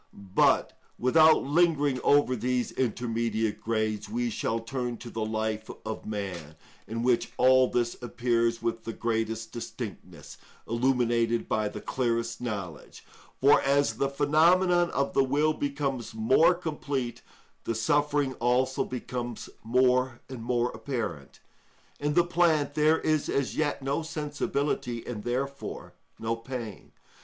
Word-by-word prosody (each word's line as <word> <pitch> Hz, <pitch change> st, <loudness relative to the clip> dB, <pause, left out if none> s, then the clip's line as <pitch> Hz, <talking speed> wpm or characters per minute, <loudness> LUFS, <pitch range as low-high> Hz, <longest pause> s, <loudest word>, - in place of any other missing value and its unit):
But -, -, +3 dB, 0.2 s
without 155 Hz, +6 st, +5 dB
lingering 145 Hz, -3 st, +2 dB
over 145 Hz, -3 st, +4 dB
these 125 Hz, +1 st, -1 dB
intermediate 115 Hz, -3 st, -1 dB
grades, 110 Hz, -1 st, -1 dB
we 240 Hz, +1 st, -1 dB
shall 115 Hz, -, -1 dB
turn 120 Hz, +1 st, -4 dB
to 120 Hz, -, -9 dB
the 110 Hz, -, -3 dB
life 110 Hz, 0 st, -2 dB, 0.2 s
of 110 Hz, 0 st, -5 dB
man, 95 Hz, -8 st, -5 dB, 0.3 s
in 115 Hz, +1 st, -3 dB
which 120 Hz, -1 st, +1 dB
all 130 Hz, 0 st, +5 dB
this 120 Hz, -1 st, 0 dB
appears 115 Hz, -1 st, 0 dB
with 115 Hz, -1 st, -2 dB
the 115 Hz, -, -5 dB
greatest 115 Hz, -1 st, -2 dB
distinctness, 120 Hz, -, -8 dB, 0.3 s
illuminated 120 Hz, -1 st, +1 dB
by 110 Hz, -2 st, 0 dB
the -, -, -8 dB
clearest 115 Hz, -2 st, -1 dB
knowledge; 100 Hz, -10 st, -6 dB, 0.3 s
for 140 Hz, +2 st, +6 dB
as 140 Hz, +1 st, +2 dB
the 140 Hz, -, +1 dB
phenomenon 170 Hz, +5 st, +3 dB
of 140 Hz, 0 st, -1 dB
will 145 Hz, +3 st, +3 dB
becomes 140 Hz, -5 st, -3 dB
more 130 Hz, +11 st, +4 dB
complete, 145 Hz, -7 st, -4 dB, 0.4 s
the 115 Hz, -, -1 dB
suffering 145 Hz, +4 st, +1 dB
also 125 Hz, +2 st, +1 dB
becomes 120 Hz, -1 st, -5 dB
more 125 Hz, +1 st, +2 dB
and 130 Hz, -3 st, -8 dB
more 120 Hz, +1 st, 0 dB
apparent. 110 Hz, -, -5 dB, 0.6 s
In 145 Hz, +1 st, -1 dB
the 175 Hz, -, +5 dB
plant 170 Hz, -4 st, +2 dB
there 155 Hz, +1 st, +4 dB
is 155 Hz, -2 st, 0 dB
as 140 Hz, -2 st, -1 dB
yet 145 Hz, -3 st, -1 dB
no 140 Hz, +4 st, 0 dB
sensibility, 145 Hz, -5 st, -2 dB
and 110 Hz, -4 st, -6 dB
therefore 135 Hz, +3 st, -4 dB, 0.2 s
no 115 Hz, +1 st, -2 dB
pain. 115 Hz, -3 st, -7 dB
125 Hz, 130 wpm, -28 LUFS, 115-145 Hz, 0.6 s, for